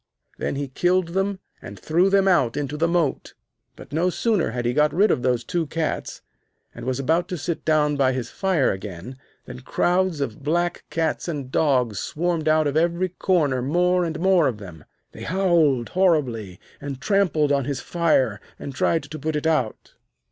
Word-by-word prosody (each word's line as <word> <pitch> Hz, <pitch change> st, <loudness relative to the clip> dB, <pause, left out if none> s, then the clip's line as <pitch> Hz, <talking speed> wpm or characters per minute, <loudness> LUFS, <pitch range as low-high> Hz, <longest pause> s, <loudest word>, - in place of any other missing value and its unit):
Then -, -, -2 dB
he 140 Hz, 0 st, -3 dB
killed 175 Hz, +6 st, +1 dB
them 195 Hz, +2 st, -1 dB, 0.2 s
and -, -, -9 dB
threw 175 Hz, +5 st, +2 dB
them 195 Hz, 0 st, +3 dB
out 135 Hz, -11 st, +2 dB
into 145 Hz, 0 st, -3 dB
the 165 Hz, +3 st, +1 dB
moat. 170 Hz, -4 st, -1 dB, 0.4 s
But -, -, -13 dB
no 170 Hz, +4 st, +2 dB
sooner 210 Hz, 0 st, 0 dB
had 120 Hz, +1 st, -4 dB
he 120 Hz, -, +1 dB
got 150 Hz, +1 st, +3 dB
rid 205 Hz, +4 st, +4 dB
of -, -, 0 dB
these 125 Hz, -2 st, 0 dB
two 165 Hz, +5 st, -2 dB
cats, 160 Hz, +1 st, -3 dB, 0.5 s
and -, -, -9 dB
was 130 Hz, 0 st, -1 dB
about 165 Hz, +6 st, +1 dB
to 180 Hz, -, -4 dB
sit 170 Hz, +1 st, -4 dB
down 150 Hz, -2 st, +2 dB
by 135 Hz, -2 st, +3 dB
his 125 Hz, -3 st, -4 dB
fire 185 Hz, -8 st, +1 dB
again, 95 Hz, +5 st, -7 dB, 0.3 s
than 60 Hz, -, -9 dB
crowds 180 Hz, -, 0 dB
of 130 Hz, -5 st, -4 dB
black 175 Hz, +4 st, -1 dB
cats 165 Hz, +1 st, -1 dB
and 140 Hz, -6 st, -4 dB
dogs 125 Hz, -10 st, +1 dB
swarmed 165 Hz, -1 st, -2 dB
out 155 Hz, 0 st, +3 dB
of 145 Hz, 0 st, -1 dB
every 170 Hz, +3 st, +1 dB
corner, 160 Hz, -8 st, +1 dB
more 180 Hz, +6 st, +2 dB
and 165 Hz, -2 st, -3 dB
more 185 Hz, -3 st, +4 dB
of 120 Hz, -, -2 dB
them. 90 Hz, -7 st, -11 dB, 0.3 s
They -, -, -12 dB
howled 165 Hz, -9 st, +2 dB
horribly, 130 Hz, -, 0 dB, 0.2 s
and 140 Hz, -2 st, -6 dB
trampled 180 Hz, -6 st, +1 dB
on 140 Hz, -2 st, +1 dB
his 140 Hz, -2 st, -3 dB
fire, 135 Hz, -, +1 dB, 0.2 s
and 140 Hz, -, -7 dB
tried 160 Hz, +4 st, +1 dB
to 155 Hz, +2 st, -8 dB
put 155 Hz, +2 st, -2 dB
it 150 Hz, -, -2 dB
out. 150 Hz, -9 st, -1 dB
155 Hz, 185 wpm, -23 LUFS, 130-175 Hz, 0.5 s, rid